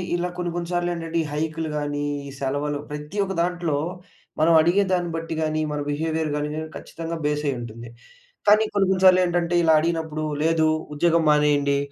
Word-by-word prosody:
ఇలా 175 0 -1
కొన్ని, 175 -1 -2
కొన్ని 170 -1 -3
సార్లు 175 0 0
ఏంటంటే, 165 -1 -4
ఈ - - -6
హైక్‌లు 160 +1 -2
గాని, 145 0 -2 0.2
ఈ - - -8
సెలవలు 145 +2 -2
ప్రతి 150 +6 -7
ఒక్క 195 0 -3
దాంట్లో, 175 -4 -1 0.6
మనం 160 +2 +4
అడిగేదాన్ని 180 +1 +2
బట్టి 165 0 -4
గాని, 155 0 0
మన 150 - -2
బిహేవియర్ 160 +1 -1
గాని 150 0 -2 0.3
ఖచ్చితంగా 165 0 -6
బేసయ్యి 150 -2 0
ఉంటుంది. 115 0 -8 0.6
కానీ 210 +1 +6
కొన్ని, 200 -1 +3
కొన్ని 190 0 +1
సార్లేంటంటే 175 -2 +4
ఇలా 160 -1 +5
అడిగినప్పుడు, 160 -1 -2 0.2
లేదు 160 0 +3 0.3
ఉద్యోగం 165 +2 +3
మానేయండి. 145 -1 +3
160 Hz, 160 wpm, -23 LUFS, 150-175 Hz, 0.6 s, కానీ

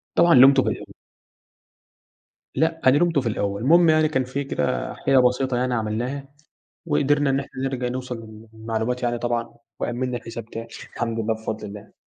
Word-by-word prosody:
طبعًا 170 0 +5
لُمته 135 +1 +7
في - - 0
الأول - - -6 1.6
لأ، 160 +3 0
أنا 130 +2 +6
لُمته 165 -3 +2
في 120 - -2
الأول. 100 -1 -2
المهم 170 +5 +5
يعني 155 -1 +4
كان 130 -4 0
في 140 +3 -4
كده 75 - -2
حكاية 135 - +2
بسيطة 125 0 +2
يعني 125 0 0
عملناها 120 +5 -3 0.6
وقدرنا 145 -1 +2
إن 135 +1 +1
إحنا 135 -1 -7
نرج 130 -2 -2
نوصل 125 0 -3 0.4
للمعلومات 110 +2 -3
يعني 120 -1 0
طبعًا 115 -1 -2 0.2
وأمِّنا 125 +1 -2
الحساب 115 -1 -7
تاني، 115 0 -8 0.3
الحمد 115 -1 -2
لله 110 0 0
بفضل 110 0 -5
الله. 105 +1 -11
125 Hz, 165 wpm, -23 LUFS, 115-140 Hz, 1.6 s, لُمته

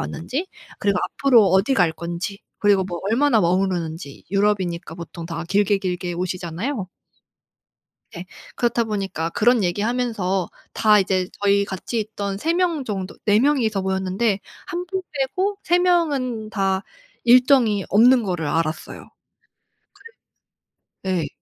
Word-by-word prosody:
왔는지 200 - -4 0.3
그리고 200 -3 +1
앞으로 245 -7 +4
어디 195 +9 +3
갈 175 -7 +3
건지 175 +5 -5 0.2
그리고 205 -2 +3
뭐 175 -2 -5
얼마나 245 0 +3
머무르는지 175 -4 -1
유럽이니까 195 -5 0
보통 170 -1 -8
다 165 0 -5
길게 200 0 +2
길게 180 -2 -3
오시잖아요. 185 - -3 1.2
네. 175 +1 -8 0.3
그렇다 240 -1 +1
보니까 195 -6 -3
그런 235 +4 +3
얘기 180 +3 -1
하면서 215 -6 -1 0.2
다 210 -1 +5
이제 185 -1 0
저희 200 0 +3
같이 200 +4 -4
있던 200 -2 -4
3 325 +10 0
명 340 -5 0
정도 195 -5 -5
4 210 0 +4
명이서 230 -7 +2
모였는데 190 +2 0 0.3
1 355 0 -4
분 380 +1 -3
빼고 370 +9 -1
3 350 +1 +3
명은 280 -11 +1
다 195 -1 0 0.4
일정이 245 -4 +5
없는 245 +5 +6
거를 175 -5 -2
알았어요. 160 +1 -3 1.9
그래서 185 -3 0
예. 145 - -4
200 Hz, 270 characters per minute, -22 LUFS, 180-240 Hz, 1.9 s, 없는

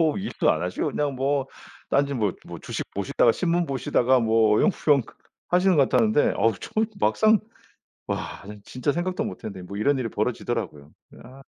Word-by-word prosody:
뭐 160 -2 +2
일도 200 - 0
안 80 - 0
하시고 90 0 -2
그냥 145 -2 -2
뭐 135 +1 0 0.4
딴짓 140 0 +1
뭐 105 -5 0
뭐 - - -8
주식 - - -5
보시다가 100 +4 +2
신문 175 +2 0
보시다가 130 -2 +2
뭐 110 -2 +3
어영부영 150 - +3 0.5
하시는 180 0 +3
것 140 -3 +4
같았는데 115 +2 +3
어우 115 -2 +2
저는 220 0 -1
막상. 220 0 +4 0.7
와 - - -4
전 105 0 -10
진짜 130 +3 -2
생각도 180 +5 -2
못 - - -7
했는데 95 -3 -6
뭐 100 +2 -7
이런 140 +7 +2
일이 125 -3 -2
벌어지더라고요. 105 -9 -3 0.3
아. 130 +2 -14
음. - - -13
130 Hz, 365 characters per minute, -24 LUFS, 110-150 Hz, 0.7 s, 것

